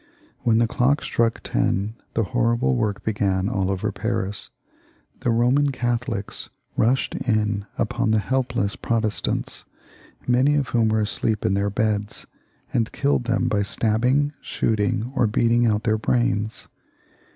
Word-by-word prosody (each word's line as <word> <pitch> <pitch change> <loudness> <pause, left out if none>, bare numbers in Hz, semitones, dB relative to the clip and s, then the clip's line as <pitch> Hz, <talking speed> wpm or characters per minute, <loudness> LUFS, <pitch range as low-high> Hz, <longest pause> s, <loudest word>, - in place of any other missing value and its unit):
When 115 -2 +2
the 115 - +4
clock 130 +5 +1
struck 115 -1 0
ten 100 +3 0 0.2
the 115 - +2
horrible 115 - +1
work 105 - -1
began 100 -3 0
all 95 -4 0
over 95 -1 -1
Paris. 95 +1 -3 0.7
The - - -1
Boman 125 +5 +3
Catholics 120 -4 -2 0.3
rushed 125 +4 +1
in 105 -4 0
upon - - 0
the 110 - +3
helpless 120 -3 -1
Protestants, 110 -3 -2 0.6
many 130 +4 +3
of 140 -4 0
whom 115 -2 +2
were 110 0 +2
asleep 105 0 -1
in 95 - +2
their 100 +1 +1
beds, 105 0 -1 0.5
aud 115 -2 +1
kiUed 140 -3 0
them 120 -1 +1
by 105 - +1
stabbing, 125 +8 +1
shooting, 110 +3 -1
or 120 -3 +3
beating 115 +2 +2
out 105 -1 +1
their 110 -1 +1
brains. 110 -2 0
110 Hz, 140 wpm, -23 LUFS, 105-120 Hz, 0.7 s, the